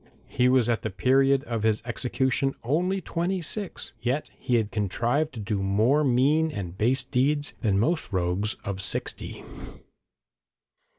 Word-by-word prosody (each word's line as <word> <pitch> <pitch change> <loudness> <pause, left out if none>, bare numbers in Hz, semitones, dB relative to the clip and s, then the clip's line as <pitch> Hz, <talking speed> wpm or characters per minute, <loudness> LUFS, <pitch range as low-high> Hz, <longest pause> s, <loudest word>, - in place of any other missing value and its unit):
He 125 0 +2
was 130 -3 +3
at 115 -1 0
the 110 - -3
period 135 +6 +3
of 115 -5 -3
his 110 -1 +1
execution 130 +2 0
only 180 +10 0
twenty 175 +3 -2
six, 190 +3 -3
yet 125 +5 -2
he 125 -2 -1
had 110 -3 +1
contrived 115 - 0
to - - -6
do 105 -1 -2
more 110 +10 +2
mean 145 +5 +3
and 95 - -6
base 120 +7 +2
deeds 145 +3 0
than 105 -5 +2
most 155 - 0
rogues 95 +3 0
of 95 -1 -3
sixty. 100 - -2
125 Hz, 145 wpm, -26 LUFS, 105-145 Hz, -, was